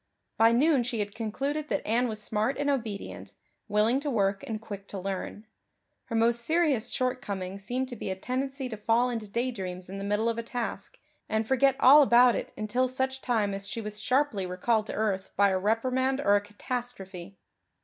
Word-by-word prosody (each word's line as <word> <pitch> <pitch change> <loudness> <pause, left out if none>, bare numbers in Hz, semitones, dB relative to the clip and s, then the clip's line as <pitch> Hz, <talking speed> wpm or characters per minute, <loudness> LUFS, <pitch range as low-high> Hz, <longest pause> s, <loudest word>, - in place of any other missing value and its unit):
By 225 +1 +5
noon 275 +3 +4
she 240 0 -3
had 205 -1 -2
concluded 275 +8 -3
that - - -1
Anne 240 +3 +2
was 215 -2 -4
smart 215 +4 -1
and 285 0 +1
obedient, 220 -7 -4 0.3
willing 215 +4 +2
to 290 +1 -3
work 200 -5 +1
and 220 -2 -3
quick 200 -3 -8
to 200 - -6
learn; 195 +3 -5 0.6
her 230 - -4
most 230 +1 +3
serious 295 -5 +1
shortcoming 200 -7 -3
seemed 245 +6 -2
to 245 - -6
be 205 - -5
a 190 - -1
tendency 265 +6 -3
to 220 - -6
fall 230 +4 +2
into 225 -3 -4
daydreams 195 -6 -3
in 195 +1 -6
the - - -5
middle 210 +3 0
of 230 0 0
a - - 0
task 240 - -5 0.3
and 220 0 0
forget 265 +1 +3
all 285 +4 +9
about 245 -2 +6
it - - -4
until 230 +4 0
such 265 +1 -2
time 215 -5 0
as 195 0 -6
she 230 - -4
was 210 -1 -6
sharply 260 -7 +1
recalled 215 +4 0
to - - -5
earth 200 -3 -1
by 200 0 +5
a 190 -1 +1
reprimand 255 +6 +1
or 205 -8 +4
a 205 - +3
catastrophe. 205 -4 -6
225 Hz, 195 wpm, -28 LUFS, 205-255 Hz, 0.6 s, all